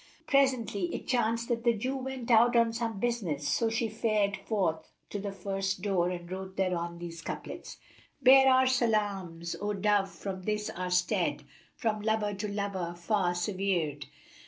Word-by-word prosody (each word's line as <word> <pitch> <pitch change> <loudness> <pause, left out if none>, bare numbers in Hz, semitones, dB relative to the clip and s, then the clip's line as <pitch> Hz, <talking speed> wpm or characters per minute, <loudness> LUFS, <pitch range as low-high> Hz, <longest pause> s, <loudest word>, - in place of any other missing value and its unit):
Presently 235 -9 +1
it - - -6
chanced 235 -2 +1
that 230 -1 0
the 235 -1 +3
Jew 255 +6 -2
went 265 -2 -4
out 235 +2 +6
on 230 -1 +4
some 225 -3 -3
business 195 -12 -1
so 230 - +2
she 225 +1 0
fared 215 -2 +1
forth 170 -9 -2 0.2
to 205 - -3
the 200 0 -4
first 195 -1 -3
door 185 -4 +1
and 175 -1 -6
wrote 190 0 -6
thereon 170 -2 -1
these 170 -1 -7
couplets, - - -7 0.4
"Bear 265 0 +7
our 260 0 +5
salams, 205 -9 0
O 210 0 -1
Dove, 205 -1 +2
from 195 -1 -6
this 210 +2 -2
our 180 +1 -4
stead 180 0 +1 0.2
* - - -32
From 215 -2 -1
lover 215 -1 0
to 200 +2 -4
beloved 200 -4 -3
far 180 -1 +1
severčd! 175 -5 -1
205 Hz, 165 wpm, -30 LUFS, 180-230 Hz, 0.4 s, Bear